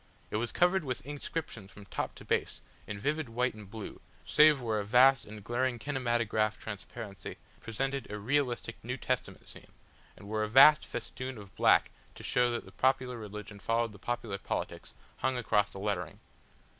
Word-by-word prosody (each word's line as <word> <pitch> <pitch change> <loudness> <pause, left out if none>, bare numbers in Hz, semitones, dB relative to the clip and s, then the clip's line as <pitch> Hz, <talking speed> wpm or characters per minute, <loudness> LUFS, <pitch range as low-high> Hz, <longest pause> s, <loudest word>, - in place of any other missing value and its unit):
It - - 0
was 120 +2 -1
covered 180 +1 +3
with 125 -3 -4
inscriptions 145 -7 -5
from 100 0 -13
top - - -4
to - - -12
base, - - 0 0.3
in 105 - -4
vivid 145 +4 -1
white 125 +2 0
and 105 -2 -11
blue, 110 -1 -8 0.2
save 150 -2 +6
where 110 -3 -1
a - - -1
vast 130 +6 +5
and 105 -1 -10
glaring 120 +2 0
kinematograph 120 -4 0
transparency 105 0 -7 0.2
presented 135 +4 -3
a 105 - -3
realistic 120 0 -1
New 125 +3 -3
Testament 130 -2 -3
scene, - - -13 0.4
and 100 - -12
where 110 +1 -1
a 110 - -1
vast 140 +6 +8
festoon 130 -1 -5
of 100 -2 -12
black - - +4 0.2
to - - -11
show 125 0 +2
that 120 -1 -3
the - - -13
popular 130 -2 +1
religion 105 -1 -8
followed 115 +2 0
the 100 - -14
popular 115 -4 -3
politics, - - -4 0.2
hung 130 -1 0
across 105 -4 +2
the 95 - -8
lettering. 95 -5 -2
120 Hz, 175 wpm, -31 LUFS, 105-130 Hz, 0.4 s, vast